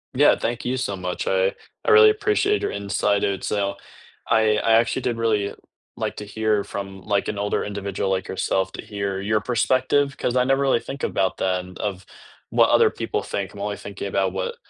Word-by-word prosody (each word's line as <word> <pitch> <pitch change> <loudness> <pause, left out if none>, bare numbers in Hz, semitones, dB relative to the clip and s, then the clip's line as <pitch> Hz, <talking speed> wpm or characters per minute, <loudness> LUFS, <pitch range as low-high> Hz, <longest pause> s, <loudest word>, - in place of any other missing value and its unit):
Yeah, 145 +3 +5
thank 120 +1 -3
you 125 +1 0
so 100 -6 -2
much. 90 -1 -4
I 95 0 +2 0.3
I - - +1
really 440 0 +9
appreciate 420 -1 +1
your - - -1
insight 100 0 0
and 100 -1 -1
so 100 -1 -1 0.5
I 110 -1 +4
I 115 +1 +2
actually 115 +3 +3
did 120 -2 -1
really 105 -3 0 0.4
like - - -3
to 105 - -6
hear 105 0 0
from, 95 -1 -7
like, 100 0 0
an 105 - -3
older 105 0 -1
individual, 100 -1 -3
like 95 0 -1
yourself, 95 0 -1
to - - -6
hear 100 -2 -3
your 105 +2 +1
perspective 130 +4 +1
'cause 125 - -1
I 125 - +4
never 135 +2 +2
really 135 -3 +3
think 135 +3 -8
about 95 -1 0
that, 90 -1 0
and 90 0 -12
of 95 -2 -4 0.4
what - - +4
other - - +5
people - - -3
think. 100 -1 -4
I'm 100 - -9
only 105 0 -3
thinking 100 0 -6
about 95 -1 0
what 95 -1 -3
105 Hz, 205 wpm, -23 LUFS, 95-120 Hz, 0.5 s, really